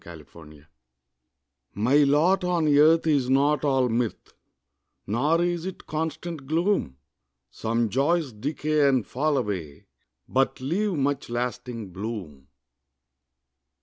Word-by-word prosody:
MY 85 Hz, -, -10 dB
LOT 75 Hz, -1 st, -15 dB, 1.1 s
My 120 Hz, +8 st, +2 dB
lot 150 Hz, +7 st, +3 dB
on 175 Hz, -3 st, +1 dB
earth 160 Hz, +3 st, +5 dB
is 140 Hz, -5 st, +1 dB
not 140 Hz, +2 st, +2 dB
all 135 Hz, -3 st, +2 dB
mirth, 115 Hz, -1 st, -3 dB, 0.7 s
Nor 150 Hz, +11 st, +1 dB
is 175 Hz, 0 st, -2 dB
it 190 Hz, -, -8 dB
constant 160 Hz, -1 st, -4 dB
gloom; 165 Hz, -, 0 dB, 0.5 s
Some 115 Hz, -, -1 dB
joys 140 Hz, +4 st, 0 dB
decay 145 Hz, +5 st, 0 dB
and 130 Hz, -5 st, +1 dB
fall 145 Hz, +3 st, 0 dB
away, 95 Hz, -, -4 dB, 0.4 s
But 135 Hz, +1 st, 0 dB
leave 185 Hz, +10 st, -1 dB
much 140 Hz, -2 st, -1 dB
lasting 120 Hz, -3 st, -4 dB
bloom. 95 Hz, -, -7 dB
135 Hz, 115 wpm, -25 LUFS, 115-155 Hz, 1.1 s, earth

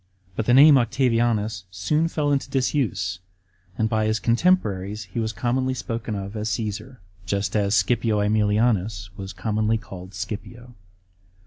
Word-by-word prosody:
But 110 Hz, -, -2 dB
the 120 Hz, -, +5 dB
name 140 Hz, 0 st, +8 dB
Octavianus 115 Hz, -5 st, 0 dB
soon 150 Hz, -, 0 dB
fill 150 Hz, -3 st, -1 dB
into 140 Hz, -1 st, 0 dB
disuse, 110 Hz, -, -1 dB, 0.6 s
and 110 Hz, -, +1 dB
by 110 Hz, -1 st, 0 dB
his 110 Hz, 0 st, +1 dB
contemporaries 110 Hz, -, +1 dB
he 95 Hz, +4 st, -6 dB
was 110 Hz, -1 st, -1 dB
commonly 130 Hz, +5 st, -1 dB
spoken 115 Hz, -3 st, -4 dB
of 100 Hz, +1 st, -6 dB
as 105 Hz, +1 st, -2 dB
Caesar, 110 Hz, +5 st, -4 dB, 0.3 s
just 100 Hz, +3 st, -1 dB
as 100 Hz, 0 st, +2 dB
Scipio 115 Hz, -3 st, +2 dB
^Emilianns 105 Hz, -2 st, +1 dB
was 95 Hz, 0 st, -7 dB
commonly 110 Hz, +3 st, 0 dB
called 95 Hz, -2 st, -10 dB
S»;ipio. 115 Hz, +5 st, -7 dB
110 Hz, 140 wpm, -24 LUFS, 100-120 Hz, 0.6 s, name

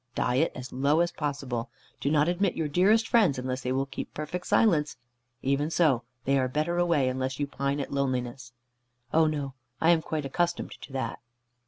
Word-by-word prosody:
Diet 130 Hz, +6 st, +2 dB
as 130 Hz, 0 st, -7 dB
low 140 Hz, +5 st, +3 dB
as 170 Hz, 0 st, +1 dB
possible. 135 Hz, -5 st, -3 dB, 0.3 s
Do 140 Hz, -, 0 dB
not 150 Hz, 0 st, +3 dB
admit 180 Hz, +2 st, +1 dB
your 160 Hz, -, -1 dB
dearest 200 Hz, +9 st, +3 dB
friends, 205 Hz, -, +4 dB
unless 130 Hz, 0 st, -3 dB
they 125 Hz, -, -2 dB
will 135 Hz, +1 st, +1 dB
keep 135 Hz, -, -6 dB
perfect 160 Hz, +4 st, -4 dB
silence. 155 Hz, -, +3 dB, 0.5 s
Even 140 Hz, +3 st, +1 dB
so, 155 Hz, -8 st, +3 dB, 0.2 s
they 140 Hz, 0 st, +3 dB
are 130 Hz, -, +1 dB
better 155 Hz, +6 st, -1 dB
away, 170 Hz, -6 st, +3 dB
unless 130 Hz, +1 st, -2 dB
you 145 Hz, -, +1 dB
pine 140 Hz, 0 st, -2 dB
at 140 Hz, -, -4 dB
loneliness." 130 Hz, -2 st, -2 dB, 0.6 s
"Oh 160 Hz, 0 st, +5 dB
no. 145 Hz, -3 st, -2 dB, 0.3 s
I 165 Hz, -, +5 dB
am 165 Hz, -2 st, +4 dB
quite 155 Hz, -2 st, -3 dB
accustomed 170 Hz, +5 st, -1 dB
to 135 Hz, -, -11 dB
that." 130 Hz, -1 st, -3 dB
145 Hz, 185 wpm, -28 LUFS, 130-165 Hz, 0.6 s, Oh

